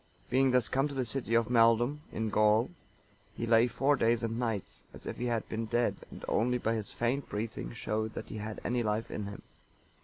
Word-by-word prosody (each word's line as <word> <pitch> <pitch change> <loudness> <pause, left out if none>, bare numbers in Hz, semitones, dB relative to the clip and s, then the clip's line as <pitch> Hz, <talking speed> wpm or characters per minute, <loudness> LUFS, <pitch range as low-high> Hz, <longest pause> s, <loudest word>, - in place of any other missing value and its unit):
Being 135 +1 +4
thus 125 -3 +4
come 135 +5 +1
to 140 - -7
the 130 -2 0
city 115 -1 0
of 115 -1 +3
Maeldum,(926) 120 +4 +4
in 110 0 -1
Gaul, 105 +2 +3 0.7
he 115 - -2
lay 115 +1 +5
four 135 +4 +2
days 115 -2 +2
and 115 0 -2
nights, 115 -5 -3
as - - -10
if - - -5
he 125 - -2
had 115 -2 -1
been 115 0 -3
dead, 120 +2 +1
and - - -9
only 125 +3 +2
by 115 -2 0
his 110 -2 -3
faint 125 +4 -1
breathing 105 - -4
showed 110 - -2
that - - -6
he - - -6
had 105 +1 -5
any 120 0 +1
life 110 +1 -1
in 105 - -4
him. 100 - -8
115 Hz, 215 wpm, -31 LUFS, 110-125 Hz, 0.7 s, lay